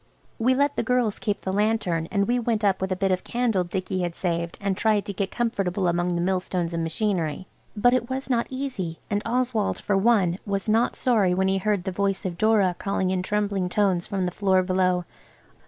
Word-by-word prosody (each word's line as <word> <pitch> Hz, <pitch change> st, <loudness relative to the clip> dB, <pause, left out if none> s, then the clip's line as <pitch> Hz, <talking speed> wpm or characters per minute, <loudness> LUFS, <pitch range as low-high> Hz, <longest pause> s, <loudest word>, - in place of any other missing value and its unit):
We 255 Hz, +3 st, +3 dB
let 285 Hz, +1 st, +1 dB
the -, -, +2 dB
girls 240 Hz, -3 st, 0 dB
keep 205 Hz, -1 st, -2 dB
the 190 Hz, -, -3 dB
lantern, 200 Hz, -6 st, 0 dB
and 200 Hz, -2 st, +1 dB
we 245 Hz, +1 st, +2 dB
went 225 Hz, -2 st, -1 dB
up 195 Hz, -2 st, +2 dB
with 190 Hz, 0 st, -2 dB
a -, -, +1 dB
bit 195 Hz, +1 st, 0 dB
of 185 Hz, 0 st, 0 dB
candle 235 Hz, -6 st, 0 dB
Dicky 185 Hz, +1 st, -3 dB
had 175 Hz, -1 st, -2 dB
saved, 170 Hz, -2 st, -2 dB
and 195 Hz, -1 st, -1 dB
tried 210 Hz, -1 st, +1 dB
to 200 Hz, -, -4 dB
get 195 Hz, +1 st, -2 dB
comfortable 195 Hz, -6 st, -1 dB
among 175 Hz, +1 st, 0 dB
the 170 Hz, -, 0 dB
millstones 180 Hz, -1 st, -1 dB
and 165 Hz, -, -1 dB
machinery, 165 Hz, -1 st, -1 dB, 0.3 s
but 245 Hz, +4 st, +4 dB
it 255 Hz, -1 st, 0 dB
was 265 Hz, +1 st, -3 dB
not 240 Hz, -3 st, +1 dB
easy, 255 Hz, -11 st, -4 dB
and 205 Hz, 0 st, +1 dB
Oswald, 240 Hz, -2 st, 0 dB
for 205 Hz, -, 0 dB
one, 195 Hz, -4 st, +3 dB
was 200 Hz, 0 st, -3 dB
not 225 Hz, +2 st, +2 dB
sorry 210 Hz, -8 st, +2 dB
when 190 Hz, +1 st, +2 dB
he 195 Hz, 0 st, +1 dB
heard 205 Hz, -1 st, 0 dB
the 190 Hz, -, -3 dB
voice 195 Hz, +1 st, -1 dB
of 175 Hz, -2 st, -4 dB
Dora 210 Hz, -5 st, +3 dB
calling 190 Hz, -2 st, -1 dB
in 185 Hz, -1 st, 0 dB
trembling 200 Hz, -1 st, -1 dB
tones 185 Hz, -3 st, +1 dB
from 195 Hz, -2 st, -1 dB
the 180 Hz, -, -1 dB
floor 190 Hz, -1 st, +2 dB
below. 180 Hz, -1 st, +1 dB
195 Hz, 215 wpm, -25 LUFS, 180-220 Hz, 0.3 s, but